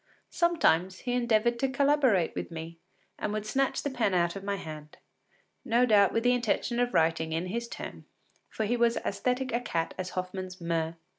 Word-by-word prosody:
Sometimes 190 - +2
he 245 - -2
endeavoured 235 -1 +2
to 270 - +1
collaborate 265 - +3
with - - -4
me, 165 0 -8 0.4
and - - -2
would 215 0 -3
snatch 270 +5 0
the 285 - -2
pen 225 -7 +1
out 170 0 +1
of 195 - -6
my 200 0 -1
hand, 155 -5 -9 0.7
no 240 +2 +3
doubt 205 -4 +5
with 230 - 0
the 245 0 +4
intention 240 0 0
of 245 0 0
writing 160 0 +2
in 165 +2 -1
his 235 +6 -3
turn, - - -8 0.4
for 220 - -2
he 235 +4 +1
was 235 -1 +2
as 200 0 -4
æsthetic 250 0 0
a 240 - 0
cat 165 -8 -2
as 185 -1 -5
Hoffmann’s 185 0 -4
Murr. 165 -1 -1
210 Hz, 195 wpm, -29 LUFS, 175-245 Hz, 0.7 s, doubt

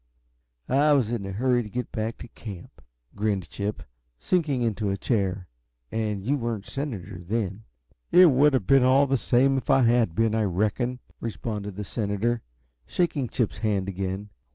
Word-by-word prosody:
"I 145 +3 +4
was 125 -6 +2
in 105 -5 -3
a - - -4
hurry 125 +4 +2
to 105 - -7
get 125 +2 -4
back 110 +1 -3
to - - -9
camp," 100 -7 -10 0.3
grinned 100 -3 -1
Chip, 100 +1 -3 0.3
sinking 145 - 0
into 110 -2 0
a 100 - -1
chair. 95 -4 -1 0.4
"And 105 -3 -2
you 140 +4 +2
weren't 115 -5 -3
a - - -10
senator 105 - -5
then." 105 +1 -3 0.5
"It 180 -3 +8
would 140 +3 +4
have 115 -7 0
been 135 +4 +5
all 130 +2 +5
the 135 0 +1
same 135 +2 +3
if - - -14
I 135 -1 +5
had 115 -7 +3
been, 115 0 +2
I 110 - +2
reckon," 110 +7 0 0.2
responded 105 -3 -4
the 105 - -4
senator, 110 +3 -1 0.5
shaking 160 -7 0
Chip's 120 -5 -1
hand 100 -4 0
again. 95 +2 -4
110 Hz, 175 wpm, -26 LUFS, 100-130 Hz, 0.5 s, It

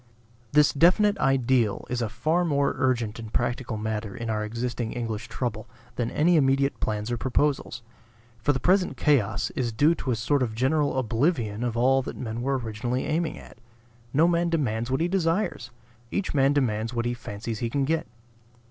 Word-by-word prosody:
This 150 0 +5
definite 200 +7 +4
ideal 130 -5 +2
is 125 -1 -2
a 115 - -1
far 160 +9 0
more 140 -4 +1
urgent 120 -4 0
and 110 -2 -8
practical 120 -1 -1
matter 105 -1 -3
in 115 -1 -3
our 105 0 -1
existing 115 +1 -3
English 115 -3 -4
trouble 110 -4 -4 0.3
than 120 -2 -1
any 165 +5 +3
immediate 135 -1 +2
plans 105 +2 -2
or 120 - 0
proposals. 130 -1 -1 0.6
For 120 +5 +2
the 135 - -1
present 185 +5 +2
chaos 110 -10 +1
is 120 -3 -2
due 145 +9 +4
to 145 - -5
a 120 - +2
sort 135 +6 +1
of 115 -4 -1
general 140 +3 +1
oblivion 120 - 0
of 120 -1 -2
all 135 +3 +4
that - - -7
men 115 -1 -4
were 135 +2 0
originally 120 +2 -3
aiming 160 0 -1
at. - - -14 0.5
No 155 +5 +4
man 170 0 +2
demands 120 -8 -1
what 130 +4 0
he 170 - +2
desires; 180 +2 0 0.4
each 190 - -2
man 135 -1 +4
demands 115 -4 0
what 120 0 -1
he 120 - 0
fancies 110 -1 -6
he 120 - -1
can 140 +3 0
get. 160 +3 -1
125 Hz, 185 wpm, -26 LUFS, 115-145 Hz, 0.6 s, This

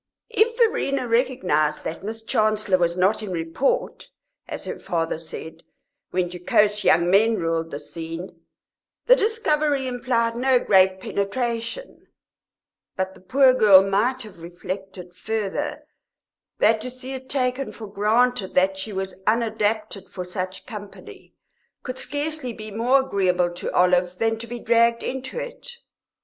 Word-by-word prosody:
If 460 +1 +2
Verena 275 - +1
recognised 230 - +1
that 165 - -5
Miss 220 +2 -5
Chancellor 215 -5 +1
was 170 0 +1
not 200 +4 +2
in 210 - -5
report, 180 - -1 0.4
as - - -6
her - - -6
father 165 -2 -2
said, 160 0 -8 0.5
when 180 -1 -1
jocose 205 +4 +2
young 170 +2 +4
men 220 +4 +4
ruled 165 -3 -1
the 145 - -5
scene, 165 +2 -8 0.6
the - - +7
discovery 305 - +1
implied 240 -2 0
no 255 +1 +3
great 190 -4 +4
penetration; 235 - -3 0.9
but 190 0 -2
the - - -17
poor 260 +7 +4
girl 200 -6 +7
might 225 +7 0
have 210 -5 -13
reflected 180 +1 -7
further 220 +8 -3 0.7
that 220 0 +3
to 255 - -4
see 255 +1 -7
it 260 0 -8
taken 260 0 0
for 225 - -9
granted 215 +1 +1
that 190 +1 +2
she 215 +3 -5
was 190 -1 -5
unadapted 215 -2 0
for 180 - -6
such 185 0 -5
company 205 -4 -11 0.5
could 255 0 -5
scarcely 290 -3 -3
be 215 -1 -8
more 245 +6 +3
agreeable 185 -7 +1
to 175 - -5
Olive 180 0 +2
than 225 +1 0
to 235 - -7
be 240 +1 -5
dragged 235 0 +2
into 265 - -5
it. - - -7
215 Hz, 140 wpm, -23 LUFS, 185-255 Hz, 0.9 s, the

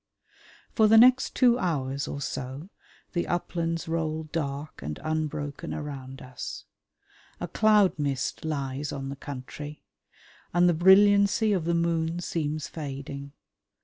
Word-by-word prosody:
For 220 -2 +5
the 225 +1 +6
next 255 +3 +6
two 245 -1 +4
hours 140 - -1
or 140 - -5
so 135 +6 -5 0.4
the 175 -2 -1
uplands 165 -1 -2
roll 160 -1 -1
dark 150 -2 -4
and 75 +3 -5
unbroken 155 0 -3
around 135 -3 -7
us. 130 -1 -7 0.7
A - - -3
cloud 210 -6 +3
mist 140 -3 -2
lies 140 -2 -3
on 135 -1 -5
the 140 - -5
country, 145 +2 -8 0.7
and 175 0 +5
the 175 - +4
brilliancy 200 +4 +5
of 180 -5 -1
the 170 0 +1
moon 170 0 0
seems 155 -3 -2
fading. 140 -2 -7
155 Hz, 130 wpm, -27 LUFS, 140-175 Hz, 0.7 s, the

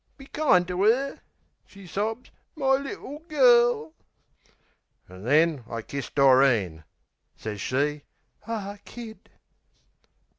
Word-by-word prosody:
Be 270 - -13
kind 270 - +2
to 180 +1 -1
'er," 260 +6 +2 0.5
she 200 -1 -14
sobs, 215 +7 -4 0.2
"my 270 -3 +2
little 275 +1 -4
girl!" 240 - +3 1.1
An' 95 +1 -13
then 150 0 +3
I 115 -1 -5
kiss 140 +1 -6
Doreen. 130 - +3 0.5
Sez 105 -2 -6
she 145 +5 -1 0.5
"Ah 205 -3 -5
Kid!" 230 -2 -11
185 Hz, 105 wpm, -26 LUFS, -, 1.1 s, girl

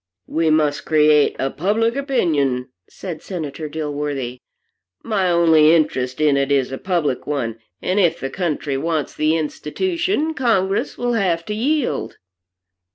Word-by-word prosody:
"We 160 - 0
must 150 -2 +2
create 150 -2 +4
a 135 0 -1
public 220 - 0
opinion," 150 - 0 0.2
said 175 -4 -7
Senator 155 -4 -5
Dilworthy. 145 -5 -4 0.6
"My 200 -5 0
only 165 -2 +5
interest 130 -5 0
in 150 -2 +3
it 140 0 0
is 135 -2 +2
a 135 - -5
public 165 -9 -1
one, 115 -6 -2 0.2
and 185 +3 +1
if 170 -4 +2
the 135 - -4
country 150 -5 -2
wants 155 +1 -2
the 155 +1 +1
institution, 320 - -1
Congress 205 -8 0
will 245 0 -1
have 175 -7 0
to 210 - -3
yield." 275 +5 -1
160 Hz, 140 wpm, -20 LUFS, 145-195 Hz, 0.6 s, only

